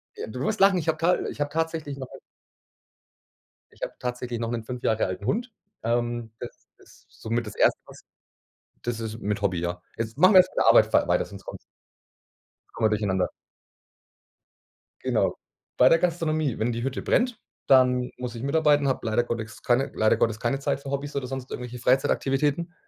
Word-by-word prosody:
Äh, - - -6
du 125 - -7
wirst 215 +8 -1
lachen, 195 -1 +6
ich 165 - -3
hab 155 0 +1
ta 175 +2 +3
ich - - -9
habe 145 - 0
tatsächlich 160 -3 -2
noch 130 -2 -7
einen - - -11 1.5
Ich - - -23
habe - - -3
tatsächlich 125 -1 -4
noch 115 0 -2
'nen 115 -2 -3
5 125 +1 -7
Jahre 110 0 +2
alten 95 +2 -5
Hund. 235 - -1 0.3
Ähm, 120 0 -1
das 120 - -10
ist - - -21
somit 115 +1 -3
das 105 - -8
Erste, - - +3
was - - -14 0.8
das 120 -1 -3
ist 110 0 -5
mit 105 0 -2
Hobby, 95 -3 +1
ja. 90 0 -3
Jetzt 115 +2 -4
machen 185 +4 +6
wir - - +10
erst 185 0 +5
meine - - +3
Arbeit - - +7
fer - - +2
weiter, - - +2
sonst - - -12
kommt's - - -9 1.1
kommen 110 -1 +1
wir 105 - +1
durcheinander. 95 -3 0 1.7
Genau. - - +1 0.4
Bei 125 - +7
der 165 - +5
Gastronomie, 155 -6 0
wenn 115 +2 +1
die 115 +1 -3
Hütte 135 0 -2
brennt, 245 -1 +1 0.3
dann 125 -2 +4
muss 125 -1 -5
ich 115 - -6
mitarbeiten, 145 -1 +3
habe 130 - -1
leider 115 +2 +2
Gottes 115 -1 -5
keine 125 +2 +2
leider 110 - +3
Gottes 110 -1 +1
keine 125 +3 -1
Zeit 140 0 -1
für 140 - -7
Hobbys 140 +1 -3
oder 130 -2 -2
sonst 130 -1 -6
irgendwelche 125 0 -6
Freizeitaktivitäten, 140 +6 +1
125 Hz, 190 wpm, -26 LUFS, 115-150 Hz, 1.7 s, wir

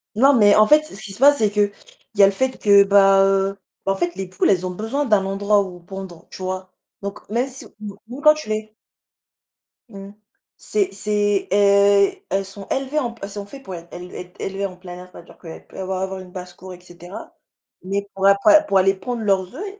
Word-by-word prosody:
Non, 270 +6 +5
mais 205 -5 +5
en 215 - +6
fait 300 +6 +5
ce 260 -10 -10
qu'il 200 - -8
se 195 - -10
passe, 285 +2 +6
c'est 215 -4 +1
qu'il 205 -1 +1 0.4
y 200 - +5
a - - +10
le 195 - +3
fait 260 +6 -2
que, 200 -1 +6
bah, 195 -1 +5
heu 195 0 +1 0.3
bah 195 - +1
en - - 0
fait 175 -2 -2
les 190 0 -5
poules, 185 0 0
elles 185 -2 +1
ont 185 - -3
besoin 225 +10 -3
d'un 210 -6 +2
endroit 200 +1 +1
où 185 -2 -7
pondre, 185 -1 -10
tu - - -10
vois? 185 0 -5 0.3
Donc 200 0 -6
même 240 +5 0
si 265 -1 -8
mou 205 -2 -8
mou 250 +4 -8
quand 305 0 +7
tu 305 -7 -9
les 215 0 -4 1.2
Mmh. 195 -2 -10 0.5
C'est 200 -2 -1
c'est, 205 0 -1
heu, 200 0 +4 0.2
elles 195 +1 -1
sont 195 0 -11
élevées 270 +3 -2
en 245 -5 -2
p 230 - -22
elles 200 - -5
sont 205 0 -7
fait 275 - -11
pour 190 -8 -9
être 170 0 -11
él 180 +1 -10
être 180 +1 -10
élevées 195 +1 -3
en 185 -2 -6
plein 180 -1 -10
air. 180 +1 -11
C'est - - -14
à - - -10
dire 170 - -18
qu'elles 165 -2 -11
peuvent - - -13
avoir 190 0 -3
avoir 190 0 -4
une 185 -1 -12
basse-cour 180 0 -10
et 180 - -13
cetera, 175 +1 -12 0.5
mais 200 +2 -3
pour 195 0 +1
apa 250 +11 +6
pour 200 -10 +1
aller 190 +1 +4
pondre 225 +4 -5
leurs 195 0 0
œufs, 340 - -6
e 410 0 -9
200 Hz, 240 wpm, -21 LUFS, 190-215 Hz, 1.2 s, a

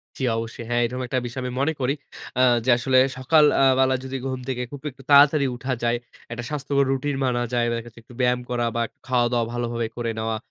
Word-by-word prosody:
জ্বি 130 - -5
অবশ্যই। 115 +1 -5
হ্যাঁ, 120 0 +1
এরকম 125 +2 -4
একটা 130 +1 0
বিষয় 130 +2 -5
আমি 125 - -3
মনে 160 +3 +1
করি 130 +2 +1 0.5
আ - - +5 0.2
যে - - +1
আসলে 130 +1 +2 0.2
সকাল 150 +4 +4 0.2
আ - - +5 0.2
বেলা 130 0 +3
যদি 135 0 -4
ঘুম 130 -1 -3
থেকে 125 -1 -2
খুব 145 -2 -8
একটু 130 - -17
তাড়াতাড়ি 145 +1 +7
উঠা 130 +1 -3
যায়, 120 0 +2 0.3
একটা 120 +1 -5
স্বাস্থ্যকর 140 -1 0
রুটিন 135 +2 -1
মানা 120 -1 0
যায়। 120 -1 +2
বা 115 - -1
দেখা 115 0 -7
যাচ্ছে 115 0 -14
একটু 120 - -16
ব্যায়াম 125 0 +2
করা 120 -1 0
বা 115 - +1 0.3
খাওয়া-দাওয়া 120 -2 +1
ভালোভাবে 120 -1 -2
করে 115 -1 -2
নেওয়া, 110 0 -1
125 Hz, 225 wpm, -23 LUFS, 120-135 Hz, 0.5 s, তাড়াতাড়ি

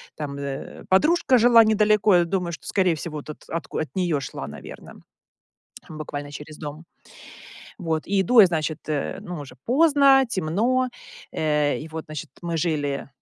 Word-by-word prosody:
там, 140 -2 -5
э, 140 -1 -6
подружка 265 - +4
жила 235 0 +7
недалеко, 215 -2 +3
я 175 - +3
думаю, 180 0 -2
что, 165 - -9
скорее 185 -4 +2
всего, 155 0 -6
вот, 150 - -9
от 155 - -9
отку 165 0 -4
от 155 - -2
неё 175 -6 +1
шла, 135 - -6
наверно, 70 -1 -11 0.9
буквально 145 -2 -6
через 150 +1 -9
дом. 150 +2 -8 0.9
Вот, 160 -4 -2
и 200 0 +1
иду 225 +5 +6
я, 200 - +9
значит, 160 -2 -3
э, 150 -2 -2
ну, 180 -5 -7
уже 135 -3 -10
поздно, 280 -1 +5
темно, 230 +8 0 0.4
э, 150 -2 +1
и 155 - -8
вот, 160 0 -7
значит, 155 -2 -7
мы 170 -1 -2
жили, 145 -5 -1
165 Hz, 165 wpm, -24 LUFS, 150-210 Hz, 0.9 s, я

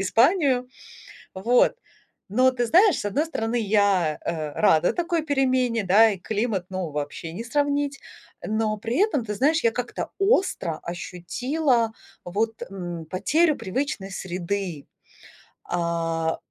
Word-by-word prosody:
Испанию. 250 - +3 0.7
Вот, 240 - +3 0.5
но 255 +6 +4
ты 245 -1 -1
знаешь, 365 - +5
с - - -5
одной 275 +10 0
стороны, 235 -7 -2
я, 200 -7 +2
э, 155 -3 -3
рада 170 -3 +3
такой 340 -1 0
перемене, 255 -6 +1
да, 205 +5 +6
и 195 - -4
климат, 210 -1 -2
ну, 185 -3 -3
вообще 150 +3 -5
не 225 - -5
сравнить. 285 +2 0 0.5
Но 215 0 0
при 230 +3 -3
этом, 290 - 0
ты 210 - -3
знаешь, 310 +7 +2
я 230 - +4
как-то 245 +1 -4
остро 390 - +1
ощутила, 230 - -1 0.3
вот, 220 +5 -2
м, 175 -4 -6
потерю 300 - +2
привычной 195 -2 -3
среды. 185 -3 -4 0.8
А, 165 -1 -1
220 Hz, 125 wpm, -24 LUFS, 180-270 Hz, 0.8 s, да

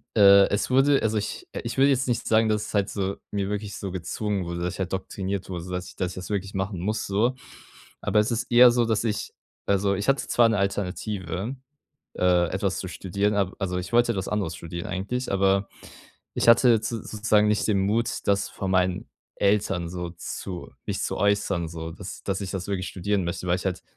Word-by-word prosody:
äh, 100 -2 +8
es 100 - 0
wurde 135 +2 +4
also 110 0 +1
ich 235 - -4 0.2
ich 115 +2 -4
würde 135 +1 +5
jetzt 130 -1 +1
nicht 120 -1 -1
sagen, 110 0 +4
dass 105 0 0
es - - -9
halt 100 -1 +1
so, 100 -1 -2
mir 100 -1 -1
wirklich 105 -1 -4
so 95 - -5
gezwungen 95 +3 -2
wurde, 85 0 -4
dass 90 0 -2
ich - - -12
halt 95 -2 -2
doktriniert 95 0 -3
wurde, 90 -3 -4
sodass 90 +1 -4
ich - - -14
das 90 0 -4
wirklich 100 -2 -3
machen 95 -1 -2
muss 110 +3 -1
so. 110 +6 +1 0.7
Aber - - +1
es 105 +3 +1
ist 115 +2 -2
eher 120 +1 +8
so, 120 0 +2
dass 110 -1 0
ich 105 -2 -2 0.4
also 100 0 +2
ich 100 +6 -1
hatte 135 - +1
zwar 120 -1 +4
'ne 110 - +1
Alternative, 100 +1 -2 0.6
äh, 90 -1 +3
etwas 95 0 -1
zu - - -4
studieren, 100 +4 -1
ab 100 -2 0
also 90 -2 -2
ich 90 +6 -6
wollte 120 0 +4
etwas 95 -4 -3
anderes 100 -6 -1
studieren 85 +3 -6
eigentlich, 100 +7 -3
aber 95 0 +2 0.7
ich - - 0
hatte 115 -1 +6
z 110 0 -4
sozusagen 105 0 +2
nicht 105 0 +1
den 100 -3 +3
Mut, 115 +3 +1 0.2
das 100 0 +2
von 95 - -4
meinen 90 -1 +1 0.3
Eltern 100 -4 +1
so 90 0 -5
zu 90 +1 -6 0.2
mich - - -2
zu - - -2
äußern 100 -3 +1
so, 80 0 -6
dass 95 +2 -9
dass 95 0 -1
ich 95 - -4
das 95 -1 -4
wirklich 95 -2 -2
studieren 100 +1 -1
möchte, 85 +1 -4
weil 90 - +3
ich 90 - -5
halt 90 -2 -2
100 Hz, 210 wpm, -25 LUFS, 95-110 Hz, 0.7 s, äh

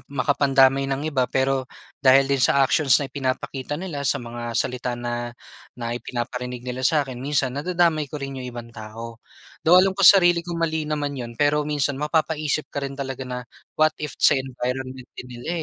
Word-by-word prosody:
makapandamay 135 -1 +3
ng 135 +2 -2
iba. 130 -2 +1
Pero, 130 -1 0 0.3
dahil 135 +1 +6
din 140 0 0
sa 135 +2 +4
actions 135 0 +4
na 135 -3 -4
pinapakita 135 +1 -3
nila, 165 -4 -5
sa 140 - +1
mga 120 -1 -6
salita 125 0 -1
na 120 0 -3 0.5
na 120 -1 -4
ipinaparinig 125 0 -5
nila 125 0 -4
sa 145 +3 +2
akin, 130 -2 -8
minsan 135 -1 0
nadadamay 160 0 +1
ko 150 - -6
rin 135 -2 -6
yung 125 - -6
ibang 120 -1 -9
tao. 115 +2 -9 0.5
Though, 175 +3 +7
alam 195 0 +2
ko 195 - -6
sarili 175 -3 +7
ko 170 0 -6
mali 160 -2 -1
naman 145 -2 -2
yun. 120 -2 -7
Pero 145 0 +2
minsan, 145 -2 -1
mapapaisip 155 -1 0
ka 140 - -2
rin 140 0 -5
talaga 135 -1 -5
na, 125 0 -5 0.3
"What 155 0 +4
if 150 -3 -4
sa - - +5
environment 130 0 -4
din - - -9
nila, 120 +2 -9
135 Hz, 185 wpm, -23 LUFS, 125-150 Hz, 0.5 s, Though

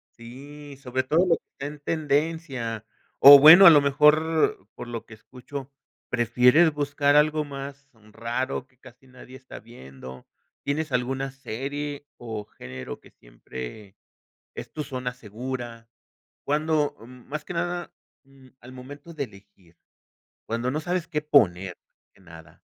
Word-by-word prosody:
sí, 140 +4 -12
sobre 130 0 -2
todo 160 +7 +2
lo 170 -2 +3
que - - -29
está 140 - -8
en 150 0 -9
tendencia, 145 -7 -2 0.3
o 140 +1 +11
bueno, 160 +7 +10
a - - +12
lo 150 -3 +7
mejor 150 -4 +2
por 120 - -8
lo 115 -1 -6
que - - -14
escucho, 130 +4 -10 0.4
prefieres 125 +7 +4
buscar 145 0 +1
algo 155 +1 +3
más 140 -1 -9 0.2
raro 120 +3 -4
que 130 -2 -34
casi 130 0 -18
nadie 130 0 -14
está 130 - -12
viendo, 65 - -13 0.4
¿tienes 150 +2 -2
alguna 130 +2 -2
serie 140 +3 -6
o 110 -3 -7
género 65 -7 -9
que - - -20
siempre 65 - -11 0.6
es - - -9
tu 155 - -4
zona 125 -2 -5
segura? 120 0 -7 0.6
¿Cuándo?, 150 0 0
mm, 125 +2 -15
más 150 +2 -5
que 180 - -8
nada, 175 +1 -3 0.3
mm, 135 -1 -20
al 125 +2 -13
momento 145 +6 -11
de 145 -3 -3
elegir, 100 -6 -19 0.7
cuándo 115 +3 -2
no 150 +4 -2
sabes 175 +1 -2
qué 150 -3 -2
poner, 95 -11 +2 0.2
más - - -85
que - - -24
nada. 80 -2 -16
135 Hz, 150 wpm, -25 LUFS, 115-150 Hz, 0.7 s, a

